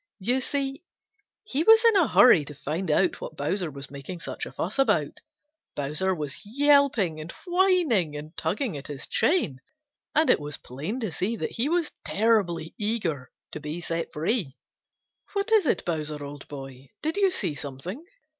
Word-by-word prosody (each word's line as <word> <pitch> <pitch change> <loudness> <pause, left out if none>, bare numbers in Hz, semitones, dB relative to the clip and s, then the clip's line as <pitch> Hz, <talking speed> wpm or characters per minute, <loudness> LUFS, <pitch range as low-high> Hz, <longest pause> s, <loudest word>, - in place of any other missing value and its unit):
You 245 +6 0
see, 275 0 -2 0.6
he 290 -8 -1
was 445 +6 +7
in 455 -2 +6
a 360 -7 +5
hurry 175 -11 +7
to 150 - -8
find 160 +6 -3
out 335 - +2
what - - -7
Bowser 185 -5 -1
was 140 -1 -8
making 140 +6 -7
such - - -5
a - - -9
fuss 200 +10 -3
about. 270 - +2 0.6
Bowser 150 +7 0
was 150 -4 -5
yelping 260 - +3
and 160 +2 -7
whining 350 - +2
and 155 +3 -8
tugging 215 - -1
at 140 -1 -7
his 145 -2 -6
chain, 160 - +1 0.5
and 315 +2 +5
it - - +3
was 150 0 -4
plain 155 - -5
to 220 -6 -2
see 205 +8 -1
that - - -3
he 250 +6 0
was 340 -1 +1
terribly 190 -7 +1
eager 185 - -2 0.2
to - - -6
be 150 +3 -5
set 165 -1 -3
free. 160 - -1 0.8
"What 400 +2 -1
is 430 -7 +5
it, - - +1
Bowser, 150 -3 -2
old 145 0 -9
boy? 135 -2 -9
Did 315 +4 -1
you 395 -1 +4
see 360 - -1
something?" 145 - -7
185 Hz, 175 wpm, -26 LUFS, -, 0.8 s, was